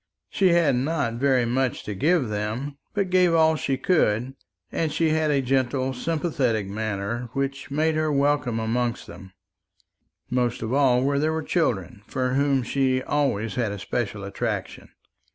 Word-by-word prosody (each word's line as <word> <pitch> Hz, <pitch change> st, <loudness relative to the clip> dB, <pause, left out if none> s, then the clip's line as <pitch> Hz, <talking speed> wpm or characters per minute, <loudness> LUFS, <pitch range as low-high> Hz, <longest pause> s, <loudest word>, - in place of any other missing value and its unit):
She 195 Hz, -, +3 dB
had 170 Hz, -6 st, +3 dB
not 130 Hz, -3 st, -1 dB
very 130 Hz, -3 st, +3 dB
much 125 Hz, +2 st, -1 dB
to 105 Hz, -, -4 dB
give 150 Hz, -, +1 dB
them, 110 Hz, +7 st, -3 dB, 0.2 s
but 195 Hz, -3 st, 0 dB
gave 180 Hz, -2 st, +4 dB
all 160 Hz, -1 st, +4 dB
she 135 Hz, -3 st, -1 dB
could; 130 Hz, -, +1 dB, 0.4 s
and 160 Hz, -2 st, -1 dB
she 165 Hz, +1 st, +1 dB
had 155 Hz, 0 st, +1 dB
a 140 Hz, -2 st, +2 dB
gentle 130 Hz, 0 st, 0 dB
sympathetic 130 Hz, -, -1 dB
manner, 110 Hz, +3 st, -3 dB
which 135 Hz, -1 st, -3 dB
made 155 Hz, +3 st, +1 dB
her 155 Hz, 0 st, 0 dB
welcome 140 Hz, -5 st, +1 dB
amongst 120 Hz, +2 st, -1 dB
them, 95 Hz, +1 st, -12 dB, 1.0 s
most 125 Hz, -1 st, -1 dB
of 110 Hz, +3 st, -2 dB
all 130 Hz, -3 st, +3 dB
where 140 Hz, +1 st, +1 dB
there 155 Hz, +2 st, +1 dB
were 160 Hz, 0 st, -2 dB
children, 110 Hz, -, -1 dB
for 130 Hz, 0 st, -1 dB
whom 140 Hz, -1 st, +2 dB
she 130 Hz, +1 st, +1 dB
had 130 Hz, -, -4 dB
always 125 Hz, -7 st, 0 dB
a 105 Hz, -4 st, -1 dB
special 105 Hz, +1 st, -3 dB
attraction. 100 Hz, -, -4 dB
130 Hz, 160 wpm, -24 LUFS, 115-150 Hz, 1.0 s, gave